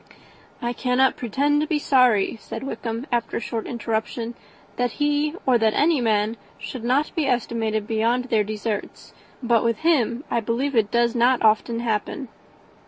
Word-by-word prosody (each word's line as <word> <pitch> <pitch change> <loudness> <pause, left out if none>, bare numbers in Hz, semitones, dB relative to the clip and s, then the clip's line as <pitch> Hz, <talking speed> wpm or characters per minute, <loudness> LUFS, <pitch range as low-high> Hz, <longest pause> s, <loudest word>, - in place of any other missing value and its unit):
"I 240 0 -1
cannot 250 +2 +2
pretend 285 +5 +1
to 305 - -1
be 310 - +1
sorry," 250 -8 +3
said - - -7
Wickham, 235 -2 -4
after 235 -2 -1
a - - -1
short 230 -1 -4
interruption, 230 0 -3 0.4
"that 245 -1 0
he 295 +1 0
or 250 -3 +4
that 220 -1 +2
any 305 -2 +3
man 220 0 +1 0.2
should 250 -4 -7
not 260 +5 +1
be 320 -5 0
estimated 225 -4 -1
beyond 230 +3 0
their 225 -4 +2
deserts; 210 0 -5 0.3
but 235 -2 +3
with 230 -2 0
him 260 -7 +2
I - - +2
believe 240 +5 -1
it 215 -3 +3
does 235 0 +2
not 245 0 +3
often 225 +2 +2
happen. 230 +3 -2
235 Hz, 165 wpm, -23 LUFS, 225-260 Hz, 0.4 s, or